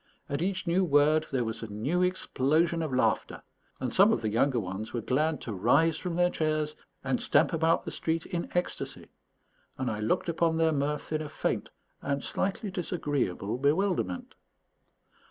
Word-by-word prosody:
At 140 +2 -2
each 190 +1 -1
new 175 +3 +2
word 155 -1 +3
there 130 -3 +1
was 110 -1 -4
a 115 - -5
new 120 - -1
explosion 165 -2 +1
of 155 -3 -2
laughter, 130 - 0 0.4
and 130 -2 -2
some 200 +4 +6
of - - +1
the 110 - 0
younger 125 +3 +2
ones 95 +2 -5
were 120 - -1
glad 150 +7 0
to 115 - -5
rise 125 - +3
from 180 -2 -3
their 175 0 +3
chairs 155 -1 -1 0.3
and 135 -2 0
stamp 155 +4 +3
about 165 0 +2
the - - -4
street 160 0 -2
in 170 -1 -4
ecstasy; 180 - -3 0.7
and 130 -1 -1
I 105 - -4
looked 105 +9 0
on 170 - 0
upon 165 0 +1
their 160 0 +3
mirth 145 +1 -2
in 155 - 0
a 150 - -5
faint - - -2 0.3
and 140 0 -2
slightly 195 +1 -2
disagreeable 145 - -2
bewilderment. 145 - 0
155 Hz, 175 wpm, -29 LUFS, 130-170 Hz, 0.7 s, some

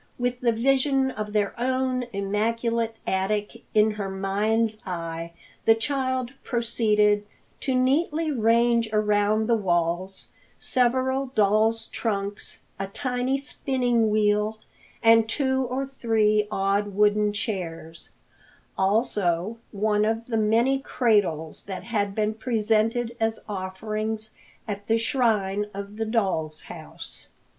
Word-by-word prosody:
With 245 0 -1
the 240 -2 +3
vision 265 +3 +2
of 210 -3 -5
their 210 -1 0
own 255 0 0
immaculate 225 +3 -1
attic 205 +2 -1
in 215 0 +5
her 205 -2 -4
mind's 215 +3 0
eye, 165 -2 -5 0.3
the 225 - +6
child 260 0 -1
proceeded 210 -4 +2 0.4
to 265 - -1
neatly 300 +5 +1
range 235 -1 +3
around 210 0 +2
the 235 +1 +3
walls 180 -1 -1 0.3
several 260 +2 +1
doll's 215 +2 +3
trunks, 205 -2 -4 0.2
a 195 - -2
tiny 250 +5 -1
spinning 250 -5 0
wheel 210 0 +2 0.5
and 225 -1 +6
two 265 0 +1
or 260 +2 -2
three 220 -5 +1
odd 200 0 0
wooden 210 0 +3
chairs; 170 -6 -5 0.7
also 200 -1 0
one 210 0 +1
of 225 +1 0
the 235 - -3
many 230 +5 +3
cradles 205 - 0
that 190 -2 -6
had 205 -4 -1
been 215 0 0
presented 225 +1 0
as 225 0 0
offerings 215 +3 -4 0.4
at 205 0 -5
the 225 - +3
shrine 215 -4 +1
of 200 +1 -7
the 225 - -1
doll's 190 -9 -1
house. - - -8
220 Hz, 115 wpm, -25 LUFS, 205-240 Hz, 0.7 s, the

